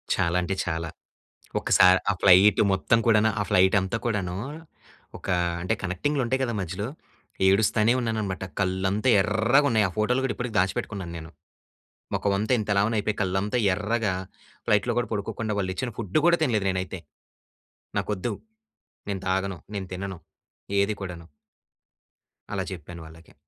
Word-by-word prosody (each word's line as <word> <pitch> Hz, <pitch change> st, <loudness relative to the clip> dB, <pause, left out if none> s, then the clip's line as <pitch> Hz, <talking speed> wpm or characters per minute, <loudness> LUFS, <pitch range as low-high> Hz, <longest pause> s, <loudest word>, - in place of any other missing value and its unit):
చాలా 85 Hz, 0 st, +1 dB
అంటే 95 Hz, +2 st, -2 dB
చాలా. 80 Hz, -1 st, -3 dB, 0.7 s
ఒకసారి 90 Hz, 0 st, +5 dB
ఆ -, -, +3 dB
ఫ్లయిట్ 100 Hz, +2 st, +6 dB
మొత్తం 105 Hz, +4 st, +2 dB
కూడాను, 110 Hz, -1 st, +4 dB
ఆ -, -, +2 dB
ఫ్లైట్ 95 Hz, +1 st, +4 dB
అంతా 95 Hz, +4 st, -2 dB
కూడాను, 100 Hz, -6 st, -1 dB, 0.8 s
ఒక -, -, -11 dB, 0.3 s
అంటే 90 Hz, -, 0 dB
కనెక్టింగ్‌లు 125 Hz, +11 st, -1 dB
ఉంటాయి 130 Hz, +3 st, 0 dB
కదా 120 Hz, -2 st, -2 dB
మధ్యలో. 95 Hz, +4 st, -4 dB, 0.6 s
ఏడుస్థానే 105 Hz, +3 st, +3 dB
ఉన్నానన్నమాట. 110 Hz, -5 st, -2 dB, 0.2 s
కళ్ళంతా 95 Hz, +4 st, 0 dB
ఎర్రగా 120 Hz, +9 st, +3 dB
ఉన్నాయి 110 Hz, -3 st, +3 dB
ఆ -, -, -7 dB
ఫోటోలు 125 Hz, +5 st, +1 dB
కూడా 130 Hz, -, -1 dB
ఇప్పటికి 120 Hz, -2 st, -4 dB
దాచిపెట్టుకున్నాను 95 Hz, -1 st, -2 dB
నేను. 80 Hz, -1 st, -10 dB, 0.8 s
మొఖమంతా 100 Hz, +3 st, 0 dB
ఇంత 105 Hz, -, -4 dB
లావున 105 Hz, +3 st, +2 dB
అయిపోయి, 105 Hz, +1 st, -1 dB
కళ్ళంతా 95 Hz, +5 st, 0 dB, 0.2 s
ఎర్రగా 105 Hz, 0 st, -1 dB, 0.5 s
ఫ్లయిట్‌లో 105 Hz, +3 st, +2 dB
గూడా 120 Hz, -, -1 dB
పడుకోకుండా 110 Hz, +1 st, -3 dB
వాళ్ళు 95 Hz, -1 st, -2 dB
ఇచ్చిన 120 Hz, +5 st, -3 dB
ఫుడ్ 105 Hz, +3 st, 0 dB
కూడా 170 Hz, 0 st, +5 dB
తినలేదు 110 Hz, -8 st, 0 dB
నేనైతే. 95 Hz, 0 st, -4 dB, 1.0 s
నాకొద్దు. 105 Hz, +2 st, -2 dB, 0.8 s
నేను 95 Hz, -1 st, -3 dB
తాగను, 95 Hz, 0 st, -1 dB, 0.2 s
నేను 95 Hz, -2 st, -4 dB
తినను, 95 Hz, 0 st, -5 dB, 0.6 s
ఏది 100 Hz, +2 st, +2 dB
కూడను... 90 Hz, -3 st, -7 dB, 1.3 s
అలా 100 Hz, -2 st, -1 dB
చెప్పాను 85 Hz, -1 st, -8 dB
వాళ్ళకి. 80 Hz, +1 st, -16 dB
100 Hz, 140 wpm, -26 LUFS, 95-110 Hz, 1.3 s, ఫ్లయిట్